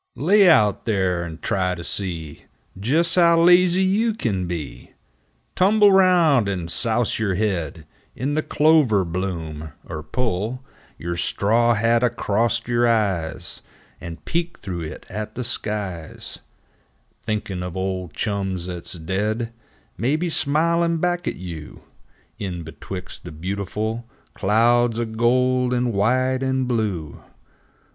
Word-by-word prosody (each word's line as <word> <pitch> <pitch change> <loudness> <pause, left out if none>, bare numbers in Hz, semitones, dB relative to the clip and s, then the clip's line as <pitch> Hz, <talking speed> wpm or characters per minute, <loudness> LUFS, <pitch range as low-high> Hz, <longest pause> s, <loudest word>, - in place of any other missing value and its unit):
7 - - -6
Lay 200 +1 +6
out 105 - +3
there 95 -6 0
and 80 -2 -7
try 90 -1 0
to 85 - -8
see 85 -5 -3 0.3
Jes' 150 - +3
how 170 -2 +5
lazy 180 +2 +5
you 210 +4 +1
kin 95 - -2
be! 85 -5 -6 0.6
Tumble 205 +2 +5
round 175 - +4
and 90 -4 -3
souse 115 +1 +1
yer 100 -4 0
head 90 -6 -2 0.3
In 140 +3 -2
the 155 - +1
clover 150 - +3
bloom, 80 -4 -4
er 75 - -5
pull 115 - -2 0.3
Yer 85 +1 -4
straw 115 +7 +2
hat 115 +2 +2
acrost 115 0 0
yer 120 0 +2
eyes 95 - -1 0.4
And 85 -1 -9
peek 170 0 -2
through 90 -4 -5
it 80 -1 -7
at 110 +2 -6
the 125 - -3
skies, 105 -8 -5 0.8
Thinkin' 100 -4 -3
of 90 0 -5
old 95 -4 -3
chums 95 -4 -2
'at's 90 -2 -5
dead, 105 +7 -2 0.5
Maybe, 155 +9 0
smilin' 165 +3 +1
back 175 +1 -1
at - - -1
you 85 -4 -9 0.6
In 90 -4 -4
betwixt 90 +3 -8
the - - -8
'beautiful 100 +7 -4 0.2
Clouds 115 +3 +2
o' 120 - 0
gold 125 +2 +1
and 120 -1 0
white 130 +6 +1
and 130 -1 0
blue 105 - -2
110 Hz, 130 wpm, -22 LUFS, 90-130 Hz, 0.8 s, Lay